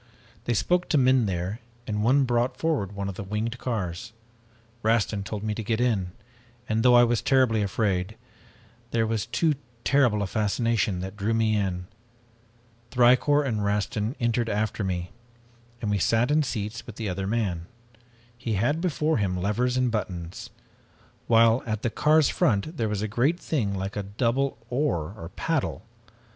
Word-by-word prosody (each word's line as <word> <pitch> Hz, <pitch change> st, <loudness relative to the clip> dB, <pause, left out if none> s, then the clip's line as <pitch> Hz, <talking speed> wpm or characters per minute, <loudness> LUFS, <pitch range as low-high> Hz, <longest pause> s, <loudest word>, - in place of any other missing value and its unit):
They 120 Hz, -, 0 dB
spoke 180 Hz, +9 st, +1 dB
to 155 Hz, -, +3 dB
men 130 Hz, -3 st, +4 dB
there 95 Hz, +4 st, -3 dB, 0.3 s
and 105 Hz, -1 st, -2 dB
one 135 Hz, +5 st, +4 dB
brought 120 Hz, 0 st, 0 dB
forward 145 Hz, -, -1 dB
one 100 Hz, -1 st, -3 dB
of 100 Hz, -, -3 dB
the 95 Hz, -, -6 dB
winged 110 Hz, +4 st, -3 dB
cars. 110 Hz, -1 st, -4 dB, 0.7 s
Rastin 110 Hz, -2 st, +1 dB
told 105 Hz, +1 st, -5 dB
me 110 Hz, -1 st, -1 dB
to 110 Hz, -, -4 dB
get 110 Hz, +2 st, -1 dB
in, 105 Hz, -8 st, 0 dB, 0.5 s
and 110 Hz, 0 st, +1 dB
though 125 Hz, +1 st, +6 dB
I 120 Hz, -, +8 dB
was 120 Hz, -1 st, +2 dB
terribly 130 Hz, -5 st, +3 dB
afraid, 100 Hz, -1 st, -1 dB, 0.7 s
there 115 Hz, -1 st, +1 dB
was 110 Hz, -1 st, -2 dB
too 120 Hz, +7 st, +2 dB, 0.3 s
terrible 125 Hz, -8 st, +3 dB
a -, -, 0 dB
fascination 105 Hz, -1 st, 0 dB
that 95 Hz, +2 st, -6 dB
drew 105 Hz, +2 st, 0 dB
me 110 Hz, -1 st, +2 dB
in. 95 Hz, -3 st, -1 dB, 1.0 s
Thicourt 130 Hz, +4 st, +4 dB
and 110 Hz, -6 st, -1 dB
Rastin 105 Hz, +3 st, -1 dB
entered 120 Hz, 0 st, 0 dB
after 105 Hz, +1 st, -1 dB
me, 90 Hz, -2 st, -3 dB, 0.7 s
and 105 Hz, -, 0 dB
we 100 Hz, -, +1 dB
sat 115 Hz, +7 st, +2 dB
in 155 Hz, +1 st, +4 dB
seats 110 Hz, -4 st, -4 dB
with 120 Hz, -, -8 dB
the 110 Hz, -2 st, -4 dB
other 95 Hz, +1 st, -3 dB
man. 95 Hz, -6 st, -1 dB, 0.7 s
He 120 Hz, -2 st, -3 dB
had 125 Hz, +11 st, +1 dB
before 160 Hz, -3 st, +1 dB
him 95 Hz, -4 st, 0 dB
levers 115 Hz, +7 st, 0 dB
and 125 Hz, -2 st, +2 dB
buttons, 90 Hz, -6 st, -4 dB, 0.8 s
while 115 Hz, +1 st, +5 dB
at 110 Hz, -1 st, -2 dB
the 120 Hz, -, 0 dB
car's 155 Hz, +2 st, +4 dB
front 115 Hz, -, +1 dB
was 105 Hz, -2 st, -1 dB
a -, -, 0 dB
great 130 Hz, -, +1 dB
thing 110 Hz, -, -1 dB
like 95 Hz, +1 st, -4 dB
a 105 Hz, -, -1 dB
double 115 Hz, +6 st, -1 dB
oar 110 Hz, -, 0 dB
or 85 Hz, -6 st, -8 dB
paddle. -, -, -1 dB
110 Hz, 165 wpm, -26 LUFS, 100-125 Hz, 1.0 s, I